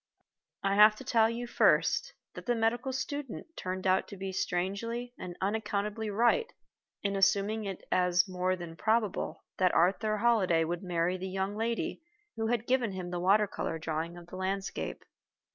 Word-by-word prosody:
I 195 0 +2
have 210 +1 +7
to 240 - -10
tell 225 -3 +3
you, 235 +1 -3
first, 240 - +3 0.2
that - - -10
the 240 - +2
medical 230 +3 0
student 285 +3 -5
turned 185 +1 -4
out 185 0 +3
to 200 - -9
be 190 0 -4
strangely 200 +7 -2
and 175 -1 -7
unaccountably 210 +1 -1
right 240 - +2 0.5
in 200 -1 0
assuming 200 +2 +2
it 195 -2 -6
as 180 +1 +3
more 185 0 0
than 175 -2 -8
probable 220 +1 0 0.2
that 185 -1 +3
Arthur 200 +5 +2
Holliday 200 -8 +3
would 170 +2 -2
marry 180 -1 0
the 190 +1 -5
young 190 +2 -2
lady 230 +7 -2 0.3
who 225 -1 -1
had 235 -1 0
given 245 -5 +1
him 180 -1 -5
the 175 - -2
water 200 +4 +4
color 165 -4 -3
drawing 160 +2 -3
of 175 - -11
the 180 +2 -9
landscape. 190 +1 -3
200 Hz, 170 wpm, -31 LUFS, 185-225 Hz, 0.5 s, have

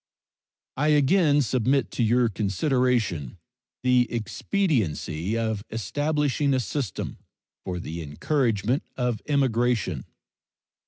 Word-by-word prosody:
I 150 +3 +1
again 150 0 +4
submit 130 +3 +1
to - - -2
your 120 +2 +3
consideration 110 - 0 0.5
the 125 -1 +3
expediency 110 - -1
of 110 -3 -1
establishing 145 - 0
a - - +2
system 120 0 -4 0.4
for 90 -1 -4
the 85 0 -5
encouragement 115 - 0 0.2
of 125 -4 -1
immigration. 120 - +1
120 Hz, 95 wpm, -25 LUFS, 100-140 Hz, 0.5 s, again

